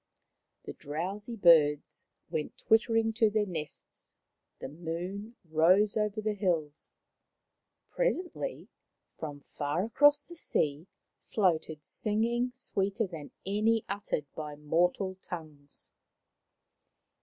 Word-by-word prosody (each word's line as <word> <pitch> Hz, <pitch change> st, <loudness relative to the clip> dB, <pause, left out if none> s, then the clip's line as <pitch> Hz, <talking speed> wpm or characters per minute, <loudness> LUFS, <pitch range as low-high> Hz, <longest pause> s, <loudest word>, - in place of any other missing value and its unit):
The -, -, -7 dB
drowsy 190 Hz, +10 st, -4 dB
birds 155 Hz, -7 st, +4 dB, 0.2 s
went 150 Hz, -, -3 dB
twitter 225 Hz, +1 st, +3 dB
ing 225 Hz, 0 st, +2 dB
to 220 Hz, -1 st, +4 dB
their 210 Hz, 0 st, +1 dB
nests, 160 Hz, -6 st, -8 dB, 0.4 s
the -, -, -6 dB
moon 175 Hz, -, -5 dB
rose 180 Hz, +6 st, +4 dB
over 210 Hz, 0 st, 0 dB
the 215 Hz, 0 st, 0 dB
hills. 165 Hz, -7 st, -2 dB, 1.0 s
Presently, -, -, -2 dB, 0.5 s
from 145 Hz, -3 st, -6 dB
far 145 Hz, +5 st, -2 dB
across 290 Hz, +6 st, +5 dB
the 345 Hz, -, -12 dB
sea, 155 Hz, -, -1 dB, 0.4 s
floated 160 Hz, -6 st, 0 dB
singing 235 Hz, +3 st, 0 dB
sweeter 210 Hz, -3 st, -1 dB
than 160 Hz, -6 st, -8 dB, 0.2 s
any 215 Hz, +3 st, +2 dB
uttered 200 Hz, -7 st, -2 dB
by 150 Hz, -1 st, -5 dB
mortal 180 Hz, +5 st, 0 dB
tongues. 155 Hz, -4 st, -9 dB
190 Hz, 105 wpm, -30 LUFS, 155-220 Hz, 1.0 s, across